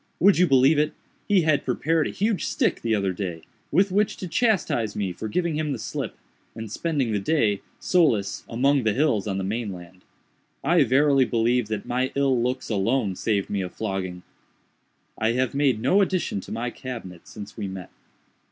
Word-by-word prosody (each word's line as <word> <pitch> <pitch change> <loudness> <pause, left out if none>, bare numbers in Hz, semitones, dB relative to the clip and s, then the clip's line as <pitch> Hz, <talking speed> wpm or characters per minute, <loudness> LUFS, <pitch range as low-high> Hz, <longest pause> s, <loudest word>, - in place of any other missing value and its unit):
Would 195 +1 +5
you 180 - +5
believe 135 +2 +5
it?—he 155 +5 -1
had 155 -2 +2
prepared 155 +5 +1
a - - -4
huge 210 0 -1
stick, - - 0
the 115 -1 +1
other 100 -2 0
day, 90 -3 -5 0.3
with 190 +5 +3
which 205 +1 +1
to 185 - -5
chastise 170 - +1
me 95 -3 -2
for 110 - -5
giving 170 +6 -1
him 150 -2 -1
the - - -3
slip, - - -5 0.4
and 110 -2 -7
spending 145 -5 -1
the 105 - 0
day, 105 -3 +1 0.2
solus, 115 - +1
among 135 +4 +2
the 110 -3 +1
hills 125 -8 +1
on 95 -2 -1
the 95 - -2
main 105 +2 -2
land. 90 0 -11 0.6
I 170 -4 +4
verily 135 +1 +4
believe 120 0 +1
that 105 -2 -4
my 130 +2 -1
ill 135 -3 +2
looks 125 +2 -2
alone 105 0 0
saved 100 0 -1
me 100 -1 0
a 90 - -4
flogging. 95 -3 -4 1.0
"I 110 +1 +2
have 130 0 0
made 140 -5 +2
no 195 - +3
addition 185 - 0
to - - -11
my 120 +2 -3
cabinet 115 -11 -8
since 105 0 -10
we 105 -3 -4
met. 95 -2 -8
120 Hz, 185 wpm, -24 LUFS, 100-150 Hz, 1.0 s, Would